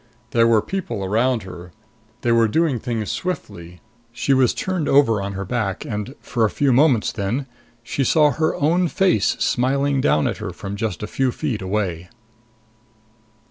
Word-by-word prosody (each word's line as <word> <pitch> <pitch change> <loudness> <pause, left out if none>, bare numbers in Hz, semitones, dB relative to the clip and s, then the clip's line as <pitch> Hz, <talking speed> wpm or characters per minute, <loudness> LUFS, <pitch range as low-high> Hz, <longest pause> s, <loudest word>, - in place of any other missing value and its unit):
There 115 -1 +4
were 110 -2 +3
people 185 - -4
around 115 +3 +1
her. 90 -1 -10 0.5
They 120 - +1
were 115 -1 +4
doing 150 +1 +1
things 115 -2 -3
swiftly. 100 - -5 0.3
She 120 +3 0
was 130 -2 +4
turned 185 -5 -2
over 115 -7 +4
on 100 0 -4
her 95 0 -4
back 105 -3 -2
and, 105 +5 -5
for 115 - -2
a 110 - +3
few 140 +2 +1
moments 130 -4 +3
then, 110 +8 -2 0.4
she 135 +4 -2
saw 150 +3 +4
her 155 +5 0
own 170 +5 +2
face 180 - +2
smiling 135 +2 +1
down 75 - +2
at - - -2
her - - -5
from 100 0 -6
just 105 -3 -3
a - - -1
few 130 +4 0
feet 125 -6 -3
away. 95 -3 -2
115 Hz, 170 wpm, -21 LUFS, 100-140 Hz, 0.5 s, There